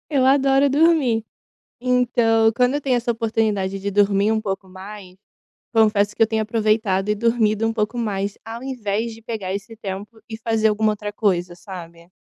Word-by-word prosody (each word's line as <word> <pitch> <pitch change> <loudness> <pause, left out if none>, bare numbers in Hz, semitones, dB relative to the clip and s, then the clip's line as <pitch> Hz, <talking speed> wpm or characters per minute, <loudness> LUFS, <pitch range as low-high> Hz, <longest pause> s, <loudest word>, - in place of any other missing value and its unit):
Eu 270 -4 +2
adoro 275 0 +4
dormir. 285 -7 +3 0.6
Então 240 -3 +3
quando 250 +2 +3
eu 290 - 0
tenho 260 -3 +1
essa 235 0 0
oportunidade 215 -4 -1
de 200 +1 -3
dormir 205 +1 +3
um 220 - 0
pouco 195 -2 -4
mais, 190 0 -10 0.6
confesso 210 -2 +3
que - - -6
eu 220 - +2
tenho 220 -1 0
aproveitado 215 -3 0
e 210 - +2
dormido 225 -1 +1
um 225 - -1
pouco 220 +1 -2
mais, 200 -3 -2
ao 230 +2 -7
invés 230 -3 -3
de 225 - -14
pegar 215 -5 -4
esse 210 +3 -6
tempo 210 +1 -7
e 220 - -6
fazer 225 -1 +1
alguma 215 0 +1
outra 210 0 -6
coisa, 180 -5 0
sabe? 170 -2 -11
220 Hz, 175 wpm, -21 LUFS, 200-230 Hz, 0.6 s, adoro